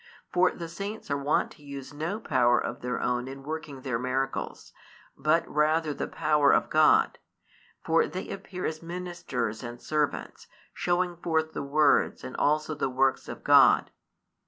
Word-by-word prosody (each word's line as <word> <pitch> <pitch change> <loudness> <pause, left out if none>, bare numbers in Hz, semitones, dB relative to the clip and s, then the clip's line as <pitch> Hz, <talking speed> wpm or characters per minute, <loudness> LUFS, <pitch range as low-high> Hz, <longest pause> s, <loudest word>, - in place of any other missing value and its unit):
For 180 +1 +4
the 170 - -7
saints 200 +1 -6
are 140 - +1
wont 140 +2 0
to 150 - -17
use 140 -1 -8
no 165 +8 -3
power 125 - +3
of - - -4
their 125 0 -2
own 125 0 -1
in 135 +1 -8
|262 - - -16
working 150 -3 -6
their 125 -3 -2
miracles, 130 +2 -3 0.4
but 155 +4 +1
rather 155 +1 +1
the - - -4
power 150 -2 +3
of - - +2
God: 155 0 +4 0.7
for 165 0 +3
they 185 - -6
appear 185 -1 -6
as 155 0 -3
ministers 170 -10 -4
and 120 -1 -7
servants, 150 +1 -2 0.3
showing 175 0 0
forth 160 -2 -1
the - - -3
words 145 +1 +2
and - - -7
also 155 +1 +1
the 145 -3 -1
works 130 +1 +1
of - - -8
God. - - +6
150 Hz, 165 wpm, -28 LUFS, 135-165 Hz, 0.7 s, God